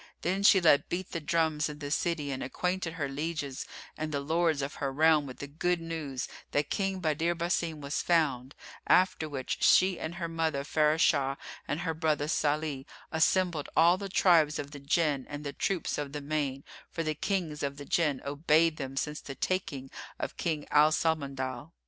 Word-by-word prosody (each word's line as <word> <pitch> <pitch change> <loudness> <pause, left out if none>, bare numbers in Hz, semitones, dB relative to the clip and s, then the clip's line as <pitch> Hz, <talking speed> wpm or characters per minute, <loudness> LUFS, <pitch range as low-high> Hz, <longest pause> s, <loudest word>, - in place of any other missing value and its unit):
Then 190 +3 0
she 200 -1 +7
let 160 -5 +4
beat 180 +1 -3
the 170 - -2
drums 160 -1 +1
in 150 - -7
the 145 -1 -6
city 155 -3 0
and 130 - -4
acquainted 180 +4 -2
her 155 -4 -2
lieges 145 -1 -4 0.3
and 155 0 -4
the 145 - -1
lords 160 0 +1
of 140 - -4
her 135 -1 0
realm 155 0 +4
with 130 - -9
the - - -6
good 170 +5 -1
news 160 -6 -4 0.3
that 145 0 0
King 195 -2 -1
Badr 165 +1 +1
Basim 170 -2 -1
was 140 +1 -2
found; 145 -6 +1 0.3
after 180 -4 +3
which 135 -3 -4
she 185 -1 +5
and 165 +2 -5
her 170 -1 -3
mother 160 -4 -1
Farashah 150 -2 +2 0.3
and 145 +4 -2
her 165 -2 -1
brother 155 -2 0
Salih 150 -3 -1 0.2
assembled 165 -1 +1
all 170 +3 +6
the 200 -1 -5
tribes 165 -5 +4
of 145 0 -5
the 145 - -8
Jinn 140 -1 0
and 145 0 -6
the 140 -1 -4
troops 180 +1 -1
of 145 -1 -4
the 150 - -4
main; 140 -2 -2 0.3
for 165 - -3
the 155 -1 -1
Kings 160 -2 -2
of 140 0 -3
the 145 - -8
Jinn 150 -5 +1
obeyed 155 +3 +2
them 135 -1 -5
since 150 +2 -2
the 135 - -8
taking 140 -8 -2 0.3
of - - -4
King 155 -4 -2
Al 150 +1 +6
Samandal. 140 -3 -2
155 Hz, 185 wpm, -30 LUFS, 140-170 Hz, 0.3 s, she